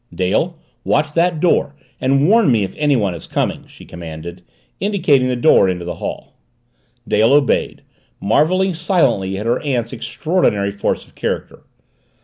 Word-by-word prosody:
"Dale, 95 - -1 0.3
watch 150 +1 +1
that 170 0 +1
door 155 -4 +1 0.2
and 135 +3 +2
warn 220 - +4
me 110 -4 +2
if 95 - -5
anyone 130 -11 +1
is 85 - -9
coming!" - - -2
she - - -15
commanded, 85 +1 -9 0.4
indicating 170 -10 +2
the 125 - 0
door 120 -6 +4
into 90 -1 -3
the 90 - -4
hall. - - -6 0.7
Dale 110 +5 +3
obeyed, 145 -2 +1 0.4
marveling 180 - +2
silently 135 - 0
at 105 - -5
her 120 +2 +1
aunt's 125 -5 -2
extraordinary 120 - 0
force 100 0 -2
of - - -24
character. - - -4
130 Hz, 145 wpm, -18 LUFS, 100-165 Hz, 0.7 s, warn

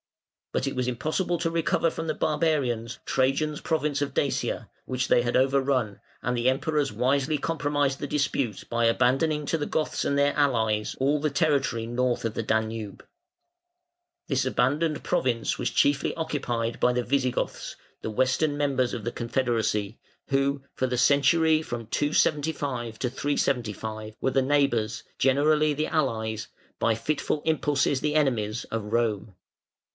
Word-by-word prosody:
But 140 - -1
it 135 - -3
was 125 -1 -1
impossible 155 +8 -1
to 165 0 -1
recover 165 0 +1
from 165 - -5
the 155 - -1
barbarians 130 -7 0
Trajan's 135 +3 0
province 150 -3 0
of 145 - -2
Dacia, 140 - -1 0.2
which 130 0 -1
they - - +4
had 120 0 +1
overrun, 130 -6 +1 0.2
and 125 +1 0
the 120 +1 +2
Emperors 145 +1 0
wisely 135 +6 +1
compromised 145 -3 0
the 145 - -3
dispute 135 -7 -1
by 120 0 0
abandoning 135 +6 +2
to 165 - 0
the 145 - -2
Goths 155 - -1
and 140 - 0
their 140 0 +3
allies 110 -7 +1
all 145 +2 +2
the 155 - +1
territory 140 -6 +1
north 120 0 -1
of 115 - -1
the 115 - -2
Danube. 110 -1 -2 1.2
This 135 -4 +1
abandoned 145 +5 +1
province 120 -3 0
was - - 0
chiefly 140 -1 +2
occupied 120 -8 -2
by 125 - +4
the 125 0 0
Visigoths, 130 -1 -1 0.2
the - - -4
Western 130 +6 +1
members 135 -4 +1
of 115 - -6
the 120 - -1
confederacy, 115 -4 -1 0.3
who 140 0 +1
for 130 - -1
the 125 -1 -2
century 155 +4 +4
from 120 -6 -5
275 145 -4 0
to 125 - 0
375 110 -5 -2
were 130 - 0
the 135 - +3
neighbours, 130 -5 +1 0.2
generally 150 +3 +3
the 155 +2 -1
allies, 110 -8 -1 0.3
by 115 - +2
fitful 150 +4 -2
impulses 145 -3 +1
the 150 0 0
enemies, 120 -7 +1
of 115 -1 -4
Rome. 110 -4 0
135 Hz, 150 wpm, -26 LUFS, 120-145 Hz, 1.2 s, they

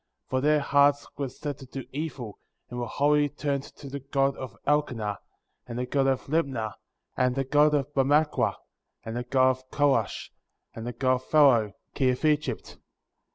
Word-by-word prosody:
For 130 0 -1
their 150 +1 +3
hearts 145 0 +3
were 140 -2 -3
set 145 +2 -6
to 135 - -11
do 135 0 -7
evil, 135 -7 -5 0.3
and 125 - -4
were 120 - -2
wholly 145 +2 +2
turned 140 -1 -2
to 140 - -12
the 140 +1 -5
god 135 0 0
of 130 - -8
Elkenah,^ 120 -9 0 0.5
and 120 -1 -6
the 125 - -1
god 135 +1 +1
of 135 -1 0
Libnah, 135 -8 -1 0.4
and 125 0 +1
the 135 - 0
god 150 +3 +4
of 145 0 -1
Mahmackrah, 145 +3 +2 0.5
and 110 - -5
the 120 - -1
god 130 +1 +3
of 130 0 -8
Korash^ 135 -8 +1 0.4
and 115 +1 -7
the 120 - -4
god 130 +2 +2
of 130 - -14
Pharaoh, 125 -9 +4 0.2
king 130 -2 +2
of 125 +4 -1
Egypt; 150 -1 +1
7. - - -15
135 Hz, 185 wpm, -27 LUFS, 125-145 Hz, 0.5 s, god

